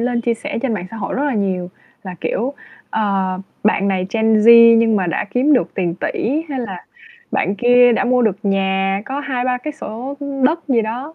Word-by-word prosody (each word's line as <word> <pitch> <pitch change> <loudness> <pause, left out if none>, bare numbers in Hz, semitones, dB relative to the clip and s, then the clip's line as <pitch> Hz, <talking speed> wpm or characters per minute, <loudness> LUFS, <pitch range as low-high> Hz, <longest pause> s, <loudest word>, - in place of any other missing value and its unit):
lên 240 0 0
chia 235 0 0
sẻ 225 - -5
trên 255 -5 0
mạng 185 -3 -5
xã 225 - -8
hội 200 -3 -4
rất 280 - -1
là 285 -3 -1
nhiều, 185 -4 -2 0.3
là 185 -2 -7
kiểu, 230 +11 -2 0.4
ờ, 195 -3 -1 0.3
bạn 200 -2 +2
này 185 -1 -1
Gen 225 -1 +2
Z 230 +1 +8
nhưng 225 -1 +3
mà 190 -3 0
đã 170 - -1
kiếm 260 +7 +2
được 260 - +1
tiền 175 -4 -1
tỷ, 270 - -2
hay 265 -2 -3
là 195 -7 -7 0.5
bạn 195 - 0
kia 245 +2 +5
đã 230 - 0
mua 250 0 +2
được 215 -5 +1
nhà 195 -1 0
có 275 +2 -4
2-3 255 -3 -2
cái 300 +5 -6
sổ, 255 +1 -7
ưm, 280 -2 -3
đất 320 +4 0
gì 240 -4 +2
đó 250 +8 -5
230 Hz, 215 wpm, -18 LUFS, 195-250 Hz, 0.5 s, Z